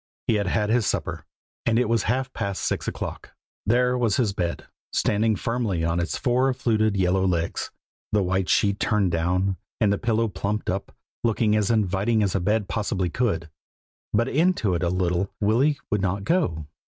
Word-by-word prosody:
He - - +2
had 100 -2 0
had 105 +3 +1
his 115 -3 +2
supper - - -2 0.4
and 115 -1 +2
it 125 -1 +2
was 115 -1 +2
half 130 +2 0
past 100 -3 -3
six - - -1
o'clock. - - -5 0.3
There 125 +2 +3
was 120 -5 +1
his 110 -6 +1
bed, 85 -3 -3 0.3
standing 110 +1 +2
firmly 110 -5 -1
on 85 +1 +1
its 85 - -1
four 130 +2 +2
fluted 110 -4 +1
yellow 95 0 +2
legs, 85 -3 -1 0.4
the 105 -2 +2
white 95 0 0
sheet 100 -1 +2
turned 105 -5 +1
down, 90 +3 0 0.2
and 105 -3 +3
the 100 - -2
pillow 115 -1 +1
plumped 100 +1 -2
up, 95 +1 -4 0.3
looking 110 -2 +2
as 105 -2 +1
inviting 110 0 +2
as 100 - 0
a 100 - +1
bed 105 +3 0
possibly 100 -5 -1
could; 85 -10 -1 0.6
but 115 +3 +2
into 155 - +2
it 85 - -1
little 90 +1 0
Willy 125 +8 +2
would 105 -3 +1
not 95 +1 -1
go. 100 - 0
105 Hz, 175 wpm, -24 LUFS, 95-115 Hz, 0.6 s, There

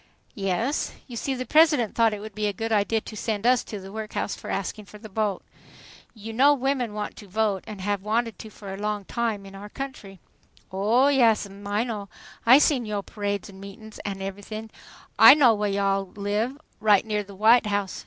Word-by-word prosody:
"Yes. 200 +8 -1
You 245 - -10
see 265 +3 -2
the 255 0 -4
President 300 -5 +4
thought 230 -1 +3
it 210 -1 -5
would 215 0 -8
be 210 0 -1
a 205 - -1
good 225 +4 -4
idea 215 +1 +1
to 215 - -10
send 215 0 -3
us 250 0 +4
to 210 - -6
the 190 0 -10
workhouse 215 -1 -4
for - - -9
asking 200 +2 -3
for 210 - -13
the 215 +1 -11
vote. 205 -1 -2 0.7
You 220 +1 -8
know 280 +5 +5
women 255 -5 -1
want 210 0 -4
to 205 - -11
vote 205 -1 0
and 205 -3 -8
have 205 0 -1
wanted 225 +1 -1
to 220 - -9
for 200 -2 -9
a - - -6
long 210 -1 -2
time 225 -3 -2
in 195 - -12
our 200 +1 -9
country" 215 -8 -8 0.5
"O 215 +8 +3
Yass'm, 215 -6 +2
I 205 +2 0
know. 210 -5 -5 0.4
I 255 +3 +9
seen 270 -5 +2
yo' 205 -1 -3
parades, 205 -1 -4
an' 190 - -14
meetin's, 205 +2 -11
an' 195 -1 -5
everythin'. 205 +3 -7 0.5
I 275 - +11
know 260 -6 +5
whah 210 -1 -1
yo' 200 0 0
all 195 0 +1
live, 210 +6 -2 0.2
right 210 -1 +4
near 210 -1 -1
the 200 -1 -11
White 220 +3 +5
House. 200 -2 -2
210 Hz, 210 wpm, -25 LUFS, 200-230 Hz, 0.7 s, I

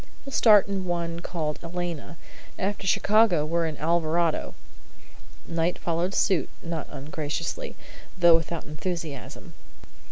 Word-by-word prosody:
"We 275 - -7
start 210 -6 +6
in 195 -2 -2
one 170 -1 -2
called 160 -4 -3
'Elena.' 170 -1 -5 0.4
After 195 0 -2
Chicago 205 -5 +4
we're 165 +1 0
in 155 -2 -5
'Alvarado.'" 165 0 +1 0.9
Knight 165 +1 0
followed 170 +3 -1
suit, 185 -4 +2
not 165 -3 -4
ungraciously, 150 - -4 0.4
though 175 -2 +7
without 165 0 -1
enthusiasm. 155 -2 -6
170 Hz, 115 wpm, -26 LUFS, 160-180 Hz, 0.9 s, though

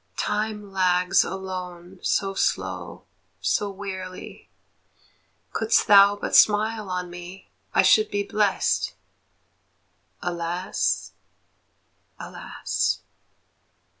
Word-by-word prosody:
Time 210 -1 -2
lags 180 -1 +3
alone 185 -1 -7
so 195 -1 0
slow, - - -2 0.4
so 205 - 0
wearily; 190 -2 -8 1.0
Couldst 225 +1 +2
thou 200 -1 +7
but 205 - -2
smile 215 0 +4
on 180 -1 -3
me, 175 +2 -10 0.2
I - - +6
should 435 0 +5
be 205 0 -1
blest. 205 -1 0 1.2
Alas, 175 +1 -2 1.1
alas! - - -2
190 Hz, 80 wpm, -24 LUFS, 180-205 Hz, 1.2 s, thou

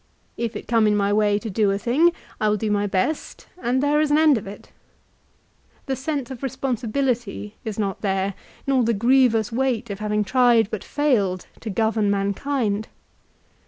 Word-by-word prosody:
If 230 -1 -3
it - - -7
come 225 -2 +3
in 210 - +3
my 200 0 +1
way 205 -1 +3
to 225 - -6
do 205 +1 +2
a 195 - +1
thing, 270 +11 +3 0.3
I 215 - +2
will 210 - +1
do 215 +1 -2
my 205 0 +1
best, 200 +11 -2 0.2
and 255 +3 +1
there 295 +1 +3
is 305 - +1
an 295 - +4
end 310 -2 +5
of 210 -4 -4
it. 200 - -11 1.1
The 270 - -1
sense 270 -1 -3
of 255 - -8
responsibility 245 -4 -2
is 220 -2 -5
not 200 -3 -2
there, 195 -1 0 0.3
nor 265 -2 +2
the 230 0 +1
grievous 235 -1 +3
weight 240 -2 -1
of 200 - -6
having 210 0 0
tried 240 -2 +3
but 215 - -4
failed 215 -11 0
to 225 - -6
govern 220 0 +1
mankind. 205 +2 -1
225 Hz, 180 wpm, -23 LUFS, 205-260 Hz, 1.1 s, end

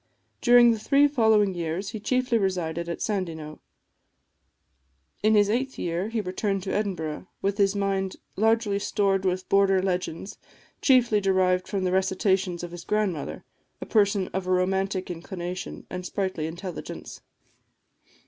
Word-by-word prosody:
During 240 0 +7
the 225 - -1
three 280 +6 +4
following 220 -7 +3
years 175 +3 -3
he 220 - -6
chiefly 250 +1 +1
resided 170 -4 -2
at 170 - -3
Sandyknowe. 165 -7 -3 1.6
In 215 +1 +4
his 205 -1 +5
eighth 260 +5 -1
year 175 +4 -2
he 225 -1 -1
returned 195 0 -2
to 190 - -3
Edinburgh, 180 -6 -3 0.2
with 200 +1 0
his 200 0 +3
mind 195 -1 -1 0.2
largely 220 -1 +2
stored 195 -1 0
with 185 0 -1
border 195 -1 +4
legends, 185 0 -3 0.4
chiefly 240 -6 +4
derived 185 -1 +2
from 195 -2 -2
the 180 - 0
recitations 190 -1 +1
of 175 - -6
his 175 0 -8
grandmother, 205 -8 -2 0.4
a - - -6
person 200 -3 +2
of 190 -1 -4
a - - 0
romantic 190 +1 0
inclination 180 +1 -6
and 180 0 -6
sprightly 185 -4 -2
intelligence. 175 +2 -7
195 Hz, 140 wpm, -26 LUFS, 180-210 Hz, 1.6 s, During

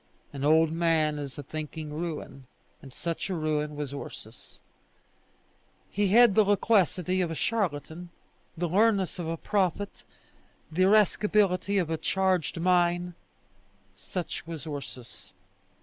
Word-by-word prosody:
An 140 -1 -5
old 160 +2 +4
man 160 -2 +1
is 140 -1 -6
a 145 - -6
thinking 155 +1 -6
ruin; 150 -5 -6 0.3
and 135 - -12
such 170 +7 -4
a 185 - -1
ruin 150 -2 -1
was 145 -2 -5
Ursus. 120 -4 -10 1.3
He 205 +1 +1
had 230 +2 +6
the 215 - +5
loquacity 190 -3 +2
of 175 - 0
a 165 - -4
charlatan, 175 -4 -2 0.5
the 175 +1 -1
leanness 195 0 +2
of 170 - -3
a 165 0 -2
prophet, 200 +1 -1 0.7
the 185 +4 +3
irascibility 205 -1 +3
of 170 -4 0
a 160 - 0
charged 185 -2 0
mine: 175 0 +2 0.8
such 170 - -6
was 165 -5 -7
Ursus. 140 -5 -9
170 Hz, 130 wpm, -28 LUFS, 155-190 Hz, 1.3 s, had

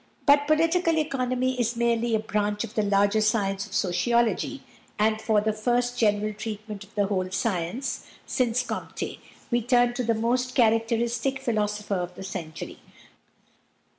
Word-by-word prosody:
But 285 0 +5
political 330 +2 +3
economy 255 -4 0
is 235 0 0
merely 235 -1 +1
a - - +2
branch 210 -1 -1
of 230 -1 -7
the 220 - +1
larger 205 +1 +3
science 200 -2 +1
of - - -14
sociology, 235 +7 +1 0.3
and 215 +1 +2
for 220 -1 +2
the 215 +1 0
first 245 +3 0
general 215 -2 +1
treatment 215 -1 -6
of 205 +3 -20
the 205 -1 +2
whole 185 -2 -1
science, 195 +5 -2 0.2
since 250 -1 +1
Comte, - - -5 0.3
we 240 0 +2
turn 245 +1 +3
to 250 +1 -2
the 230 -1 +1
most 245 +3 0
characteristic 230 +2 +2
philosopher 210 -4 -1
of 180 0 -4
the 190 - -8
century. 160 -4 -6
225 Hz, 150 wpm, -26 LUFS, 210-245 Hz, 0.3 s, But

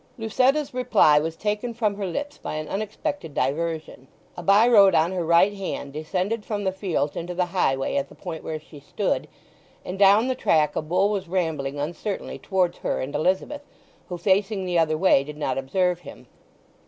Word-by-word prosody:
Lucetta's 260 +6 +1
reply 225 -12 +4
was 160 +2 -3
taken 210 +5 -3
from 215 -3 0
her 200 -1 -4
lips 290 +12 -5
by - - -5
an 155 0 -4
unexpected 215 - -4
diversion. 155 0 -2 0.3
A - - -6
by 200 +6 +5
road 200 -6 +6
on 165 +3 +3
her 180 -2 -2
right 170 +5 +4
hand 185 -8 -5
descended 185 +8 -2
from 205 -1 -3
the 190 - +1
fields 175 -7 -2
into 175 +1 -5
the 180 0 +1
highway 135 - +1
at 280 - -2
the - - -15
point 165 -4 -7
where 155 -1 -4
she 150 -1 -14
stood, - - -2 0.6
and 185 +2 -6
down 205 +4 +6
the 260 - +1
track 155 -11 +2
a - - 0
bull 180 +6 +1
was 195 -3 -3
rambling 160 -6 -2
uncertainly 175 +7 -4
towards 185 -3 0
her - - -2
and 135 +2 -4
Elizabeth, 190 - 0 0.5
who, 180 - -4
facing 195 +2 +1
the 175 -2 +1
other 155 -1 +2
way, 170 -6 +4
did 150 +1 -9
not 135 -3 -1
observe 180 +6 0
him. 155 -5 -12
185 Hz, 190 wpm, -24 LUFS, 155-205 Hz, 0.6 s, road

